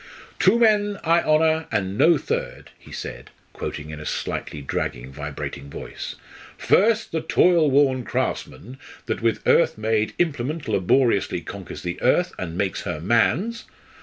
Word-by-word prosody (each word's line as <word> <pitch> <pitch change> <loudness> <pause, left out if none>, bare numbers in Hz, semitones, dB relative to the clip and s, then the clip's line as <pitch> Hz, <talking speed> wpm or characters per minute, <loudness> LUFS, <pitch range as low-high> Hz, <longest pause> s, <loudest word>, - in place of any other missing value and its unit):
"'Two 195 +5 +5
men 210 -3 +3
I 170 +1 +4
honour, 160 +1 +2
and 100 -3 -1
no 165 +8 +5
third,'" - - -4
he - - -16
said, - - -7 0.2
quoting 75 0 -6
in 75 - -7
a 75 - -8
slightly - - -4
dragging, 65 -2 -4
vibrating 70 -1 -6
voice: - - -7 0.4
"'_First, 225 +3 +3
the 160 - -1
toil 170 -4 +4
worn 135 -2 +3
craftsman 125 +2 -4 0.3
that 110 - -3
with 115 -1 0
earth - - +4
made 110 0 0
implement 150 -2 -1
laboriously 110 +2 +2
conquers - - -8
the 85 -1 -4
earth 175 +8 +2
and 85 -2 -5
makes 100 -1 -1
her 85 -3 -4
man's. 155 - +1
125 Hz, 145 wpm, -23 LUFS, -, 0.4 s, Two